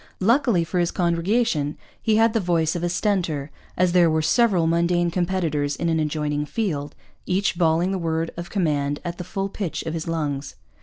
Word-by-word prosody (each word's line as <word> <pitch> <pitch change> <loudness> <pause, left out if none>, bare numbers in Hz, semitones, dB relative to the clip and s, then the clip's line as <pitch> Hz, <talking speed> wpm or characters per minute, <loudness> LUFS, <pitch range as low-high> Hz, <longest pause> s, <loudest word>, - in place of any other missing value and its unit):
Luckily 230 -3 +3
for 175 +2 -2
his 175 -1 +2
congregation 170 -3 0 0.2
he 220 - +2
had 225 0 +4
the 225 - +2
voice 170 -4 +1
of 175 - -2
a 175 - +1
Stentor, 170 -7 -1 0.3
as 180 0 +3
there 175 -2 +5
were 155 0 +1
several 190 -1 +3
mundane 170 +1 +2
competitors 165 -5 0
in 170 - -1
an 160 -1 +1
adjoining 150 -1 -1
field, 155 -10 -3 0.3
each 190 +1 +1
bawling 170 +1 +2
the 190 - -1
word 165 -1 -1
of 170 +1 -7
command 145 -7 0
at 175 +1 -4
the - - -3
full 195 +2 -3
pitch 195 -3 -4
of 160 - -4
his 165 0 -4
lungs. 145 -4 -3
170 Hz, 190 wpm, -23 LUFS, 160-185 Hz, 0.3 s, there